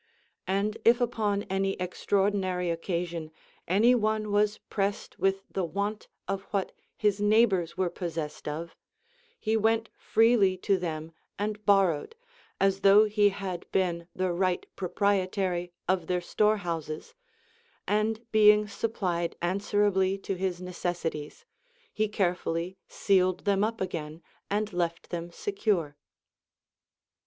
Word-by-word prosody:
And 200 +3 0
if 235 +2 +5
upon 215 -4 0
any 195 0 0
extraordinary 185 -1 0
occasion 170 -1 -3 0.4
any 215 +7 +5
one 215 -2 0
was 210 +1 +2
pressed 200 0 -3
with 195 +1 +1
the 190 - -1
want 200 +5 -3 0.2
of 195 0 -2
what 200 -2 -2 0.3
his 205 -2 +1
neig 215 +3 +5
hbors 175 -4 -2
were 185 -2 0
possessed 165 -4 -5
of, 160 +3 -5 0.6
he 220 0 0
went 225 0 +2
freely 220 -4 +3
to 195 +1 +1
them 160 -2 -4 0.3
and 210 +1 -3
borrowed, 195 - +3 0.4
as 195 0 +2
though 200 +2 +7
he 210 -1 +3
had 190 -3 -6
been 170 -3 0
the 185 -1 0
right 185 0 0
pro 185 -2 -4
prietary 185 -3 0 0.2
of 180 -2 +1
their 180 -1 +1
storehouses; 175 -5 -1 0.7
and 220 +2 0
being 210 -1 +6
supplied 185 -5 -2
answer 200 +3 +1
ably 190 -1 +2
to 195 - -4
his 185 -1 -2
necessities, 175 -4 -4 0.5
he 215 0 +1
carefully 180 -3 -1
sealed 185 -2 +1
them 200 0 +2
up 225 +1 -1
again 165 -3 -4 0.3
and 210 0 -1
left 170 -1 -2
them 170 -1 -4
secure. 190 - -1
195 Hz, 130 wpm, -28 LUFS, 175-210 Hz, 0.7 s, though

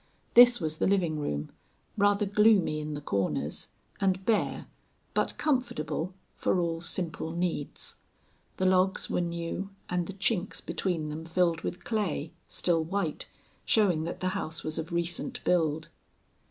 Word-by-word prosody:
This 245 0 +9
was 155 -3 -1
the - - +2
living 175 -6 +2
room, 75 - -3 0.4
rather 205 0 +3
gloomy 205 -6 +4
in 150 0 -4
the 145 - -5
corners, 100 -8 -1 0.3
and 190 -1 +1
bare, 225 -2 +1 0.5
but - - 0
comfortable, 190 - -1 0.2
for - - +1
all 165 -1 -1
simple 165 -2 -2
needs. 170 -4 -3 0.6
The 190 - 0
logs 185 +1 +3
were - - +1
new 170 +3 -3 0.2
and 175 -1 0
the 200 - -5
chinks 195 0 0
between 165 -5 -2
them 155 +2 -5
filled 165 0 +1
with 180 - -4
clay, 195 -9 -1 0.2
still 165 -2 +1
white, 170 -2 -2 0.3
showing 185 -8 +3
that 170 - -5
the 185 - +1
house 160 -3 -3
was 155 +1 -2
of 160 +2 -5
recent 170 +9 -1
build. 160 -3 +1
175 Hz, 145 wpm, -29 LUFS, 160-195 Hz, 0.6 s, This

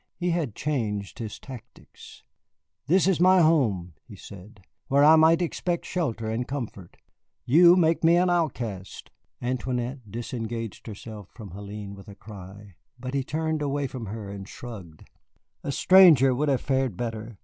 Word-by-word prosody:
He 180 -1 -1
had 160 -10 -2
changed 110 -8 -3
his 110 -3 -6
tactics. 125 -2 -13 0.6
"This 185 +4 +3
is 190 -3 +2
my 185 +1 +6
home," 115 - +2
he - - -11
said, 100 +2 -13 0.3
"where 140 +1 +3
I 155 +2 +8
might 160 +2 +5
expect 175 0 -2
shelter 120 -11 -2
and 115 +3 -2
comfort. 115 -10 -7 0.5
You 170 +6 +7
make 165 -2 +2
me 165 +1 +5
an 180 +1 +3
outcast." 120 - -3 0.3
Antoinette 125 -1 -3
disengaged 115 0 -6
herself 105 -1 -9
from 105 -7 -10
Hélène 100 +1 -8
with 100 +1 -13
a 100 - -11
cry, 100 -2 -12 0.2
but 130 +1 -6
he 140 -1 0
turned 155 +2 -2
away 145 0 -1
from 125 -4 -6
her 105 -1 -7
and 100 -1 -8
shrugged. 95 -10 -10 0.6
"A - - -3
stranger 155 -6 +6
would 145 +4 0
have 135 -3 +1
fared 130 -7 -1
better. 115 -2 -5
125 Hz, 155 wpm, -26 LUFS, 105-155 Hz, 0.6 s, I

